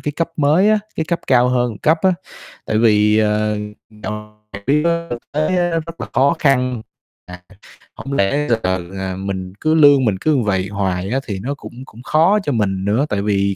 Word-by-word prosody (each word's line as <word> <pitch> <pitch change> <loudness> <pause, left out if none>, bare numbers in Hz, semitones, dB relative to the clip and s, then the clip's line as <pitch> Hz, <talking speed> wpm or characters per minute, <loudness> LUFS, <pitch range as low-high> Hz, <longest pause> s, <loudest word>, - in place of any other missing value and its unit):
cái 150 - -3
cấp 165 +3 -2
mới 155 +7 +3
á, 215 - +4 0.2
cái 160 - -1
cấp 170 -1 -1
cao 125 -1 +4
hơn 125 -1 +1
một 105 - -9
cấp 160 - +2
á. 190 - +4 0.6
Tại 110 - 0
vì, 105 -1 +4
ờ, 105 0 +1 0.5
dạo 105 0 -6 0.2
trực 100 0 -8
tiếp 150 +3 +2
á 170 0 0
thực 120 - -4
tế 155 +1 0
á 175 0 +1 0.2
rất 165 -4 -9
là 110 - -5
khó 140 +5 +3
khăn, 125 -4 +1 0.4
à, 90 0 -11 0.5
hổng 135 - -7
lẽ 140 +6 +1
giờ, 115 - +3 0.4
ờ, 95 -1 -4
mình 95 -1 -5
cứ 155 0 +2
lương 145 -4 +6
mình 105 -4 +1
cứ 150 -4 +2
vậy 95 -2 0
hoài 95 -2 -2
á 130 +4 0
thì 100 -3 -4
nó 130 +8 -3
cũng 140 - -11
cũng 120 -1 -14
khó 165 +9 +3
cho 145 - -1
mình 95 -5 -1
nữa, 110 +8 +1
tại 100 -1 -1
vì 100 -1 0
120 Hz, 215 wpm, -18 LUFS, 100-150 Hz, 0.6 s, lương